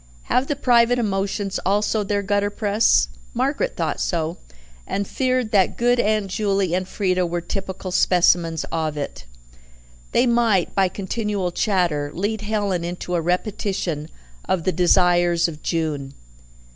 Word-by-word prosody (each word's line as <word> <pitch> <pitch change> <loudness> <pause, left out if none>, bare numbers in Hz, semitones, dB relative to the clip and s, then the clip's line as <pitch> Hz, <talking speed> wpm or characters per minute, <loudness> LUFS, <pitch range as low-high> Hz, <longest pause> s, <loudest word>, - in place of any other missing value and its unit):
Have 255 +2 +2
the 290 - -1
private 245 -2 +3
emotions 200 -2 -1
also 210 +2 +1
their 200 0 -1
gutter 205 +1 +1
press? 205 +1 +2 0.3
Margaret 280 - 0
thought - - -2
so, 165 -1 -2 0.5
and 200 0 -2
feared 255 -3 0
that 195 -4 +2
good 245 +1 +2
Aunt 215 -2 +1
Juley 195 -2 0
and 185 +1 -1
Frieda 185 -3 0
were 175 +1 -2
typical 190 +1 -5
specimens 175 -3 +3
of 155 -2 -2
it. 140 - -5 0.9
They 240 - +3
might, 235 -6 +2
by 195 -1 +3
continual 200 -1 -2
chatter, 175 -8 0
lead 205 +4 -2
Helen 205 -4 -1
into 175 +1 -5
a 175 - +1
repetition 180 -3 -2 0.4
of 185 -3 0
the 185 - +1
desires 175 -1 +3
of 155 -2 -8
June. 150 -5 -2
195 Hz, 140 wpm, -22 LUFS, 175-215 Hz, 0.9 s, private